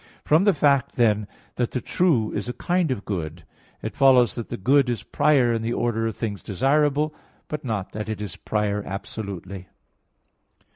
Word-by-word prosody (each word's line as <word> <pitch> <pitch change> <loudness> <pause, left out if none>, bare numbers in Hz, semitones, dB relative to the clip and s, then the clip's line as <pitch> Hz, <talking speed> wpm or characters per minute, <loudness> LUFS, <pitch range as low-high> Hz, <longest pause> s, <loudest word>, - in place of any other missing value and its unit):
From 160 +6 +4
the 205 - +5
fact, 140 -4 +2
then, 105 -4 +2 0.3
that 120 -2 0
the 125 - -2
true 125 -6 +1
is 105 +3 -3
a - - -2
kind 175 +1 0
of 125 -6 -3
good, 85 -4 -4 0.4
it - - -4
follows 130 -3 +5
that 115 - -6
the - - -4
good 135 +5 +3
is 115 -5 -2
prior 130 -4 +3
in 115 - -1
the 115 +1 -1
order 115 -2 0
of 110 - -4
things 105 -4 -3
desirable; 145 +7 +1 0.3
but 150 - -5
not 110 -7 -3
that 105 +1 -5
it 110 - -3
is 105 -5 -5
prior 105 -1 -1
absolutely. 95 -2 -6
115 Hz, 180 wpm, -24 LUFS, 105-140 Hz, 0.4 s, the